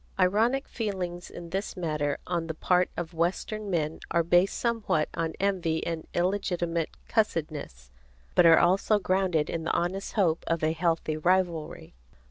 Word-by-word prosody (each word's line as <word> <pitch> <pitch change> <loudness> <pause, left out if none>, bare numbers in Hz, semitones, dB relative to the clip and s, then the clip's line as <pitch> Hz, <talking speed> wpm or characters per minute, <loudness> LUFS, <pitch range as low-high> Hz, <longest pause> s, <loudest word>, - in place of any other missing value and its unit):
Ironic 220 +9 +2
feelings 185 -6 -4
in 170 -1 -9
this 195 +2 -3
matter 150 -4 -1
on 170 -2 -2
the 160 - -4
part 180 +2 +2
of 175 0 -4
western 190 +5 -2
men 160 -4 -1
are 170 0 +2
based 175 +3 +3
somewhat 225 -10 0
on 165 -1 -2
envy 180 -5 0
and 165 -1 -4
illegitimate 175 -3 0 0.2
cussedness, 150 - -2 0.4
but 175 - +6
are 165 - +8
also 195 +4 +3
grounded 185 -5 +1
in 165 - -3
the 160 - -1
honest 190 +3 -1
hope 170 -6 +2
of 165 -1 0
a 155 - +3
healthful 165 -1 0
rivalry. 175 -2 0
175 Hz, 150 wpm, -28 LUFS, 160-190 Hz, 0.4 s, are